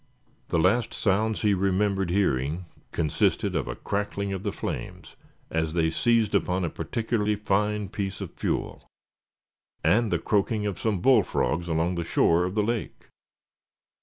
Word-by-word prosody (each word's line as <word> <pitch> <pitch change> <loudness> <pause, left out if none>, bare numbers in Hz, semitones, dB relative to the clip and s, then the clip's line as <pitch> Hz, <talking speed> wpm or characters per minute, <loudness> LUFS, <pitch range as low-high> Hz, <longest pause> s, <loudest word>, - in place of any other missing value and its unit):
The - - 0
last 100 +8 +2
sounds 110 +2 +1
he 105 -1 +4
remembered 95 0 +1
hearing 85 -3 0 0.3
consisted 80 -3 0
of - - -1
a - - -4
crackling 100 -1 -2
of 95 - -4
the - - -2
flames - - -6 0.4
as 80 -1 -1
they 80 -1 +2
seized 115 +2 +2
upon 90 -2 +1
a 85 - -3
particularly 110 -2 -1
fine 105 0 0
piece 100 0 -4
of - - -6
fuel; - - -3 1.0
and 115 0 +3
the - - +3
croaking 105 +1 0
of 100 -4 -3
some 105 -5 0
bullfrogs 95 - +2
along 85 +2 +1
the 85 -1 -2
shore 85 +1 +3
of 90 +2 -4
the 105 - +2
lake. 115 +1 -3
100 Hz, 150 wpm, -26 LUFS, 85-105 Hz, 1.0 s, he